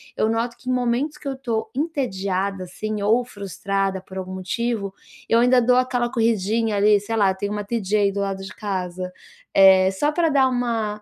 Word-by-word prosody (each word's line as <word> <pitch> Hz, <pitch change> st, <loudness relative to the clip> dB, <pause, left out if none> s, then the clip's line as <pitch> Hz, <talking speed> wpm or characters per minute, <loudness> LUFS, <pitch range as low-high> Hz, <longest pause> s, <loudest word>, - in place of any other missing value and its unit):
eu 220 Hz, -, +1 dB
noto 230 Hz, +1 st, -1 dB
que 255 Hz, -, -7 dB
em 255 Hz, -, +2 dB
momentos 250 Hz, +5 st, 0 dB
que 290 Hz, -, -9 dB
eu 275 Hz, -, -1 dB
estou 230 Hz, -4 st, -3 dB
entediada, 200 Hz, -, -2 dB
assim, 215 Hz, +3 st, -5 dB
ou 225 Hz, +5 st, +3 dB
frustrada 195 Hz, -2 st, -3 dB
por 190 Hz, 0 st, -11 dB
algum 185 Hz, 0 st, -5 dB
motivo, 200 Hz, +1 st, -2 dB, 0.3 s
eu 230 Hz, -, +4 dB
ainda 250 Hz, +1 st, +5 dB
dou 245 Hz, +1 st, +3 dB
aquela 245 Hz, -1 st, 0 dB
corridinha 225 Hz, -2 st, +1 dB
ali, 205 Hz, 0 st, +4 dB
sei 225 Hz, +3 st, -4 dB
lá, 200 Hz, -3 st, +3 dB
tem 200 Hz, +2 st, -4 dB
um 210 Hz, 0 st, -3 dB
TJ 210 Hz, -1 st, -2 dB
aí 200 Hz, -1 st, +3 dB
do 200 Hz, -, -4 dB
lado 195 Hz, -1 st, -3 dB
de 190 Hz, -, -8 dB
casa, 185 Hz, -3 st, -4 dB, 0.4 s
eh, 190 Hz, -1 st, +7 dB
só 290 Hz, +11 st, 0 dB
pra 330 Hz, +1 st, +1 dB
dar 275 Hz, -2 st, +4 dB
uma, 230 Hz, -4 st, -1 dB
215 Hz, 195 wpm, -22 LUFS, 195-245 Hz, 0.4 s, eh